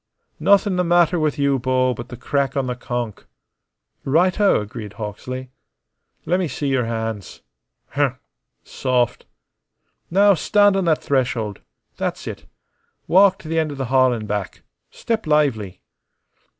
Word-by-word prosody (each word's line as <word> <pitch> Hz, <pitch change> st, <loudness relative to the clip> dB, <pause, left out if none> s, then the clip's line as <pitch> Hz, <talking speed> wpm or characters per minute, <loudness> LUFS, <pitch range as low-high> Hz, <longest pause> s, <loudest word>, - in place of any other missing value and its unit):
"Nothin' 200 Hz, -1 st, +3 dB
the 180 Hz, -, +2 dB
matter 175 Hz, 0 st, +3 dB
with 155 Hz, -2 st, 0 dB
you, 140 Hz, -1 st, +1 dB
Bo, 130 Hz, 0 st, +1 dB
but 120 Hz, +1 st, -8 dB
the 120 Hz, -, -8 dB
crack 140 Hz, +2 st, -1 dB
on 135 Hz, -, +1 dB
the 125 Hz, -1 st, -3 dB
conk." 120 Hz, -3 st, -5 dB, 0.8 s
"Right 175 Hz, +8 st, +2 dB
o!" 205 Hz, -, +4 dB
agreed 105 Hz, 0 st, -7 dB
Hawksley. 125 Hz, +5 st, -6 dB, 0.7 s
"Lemme 180 Hz, 0 st, +1 dB
see 140 Hz, 0 st, -3 dB
your 130 Hz, -3 st, +1 dB
hands. 110 Hz, -3 st, -5 dB, 0.5 s
Humph. -, -, 0 dB, 0.5 s
Soft. 125 Hz, -2 st, -1 dB, 0.8 s
Now 200 Hz, +3 st, +5 dB
stand 205 Hz, +3 st, +3 dB
on 195 Hz, -2 st, 0 dB
that 160 Hz, -2 st, +1 dB
threshold. 125 Hz, -6 st, -1 dB, 0.4 s
That's -, -, -3 dB
it. -, -, -7 dB, 0.6 s
Walk 190 Hz, +1 st, +5 dB
t' 190 Hz, -, -13 dB
the' 165 Hz, +1 st, 0 dB
end 155 Hz, -2 st, -1 dB
o' -, -, -8 dB
the 135 Hz, -1 st, -3 dB
hall 130 Hz, -1 st, +5 dB
an' 115 Hz, -3 st, -3 dB
back. 105 Hz, -2 st, -4 dB, 0.3 s
Step 225 Hz, -6 st, -3 dB
lively." 135 Hz, -11 st, +1 dB
135 Hz, 145 wpm, -21 LUFS, 120-175 Hz, 0.8 s, Now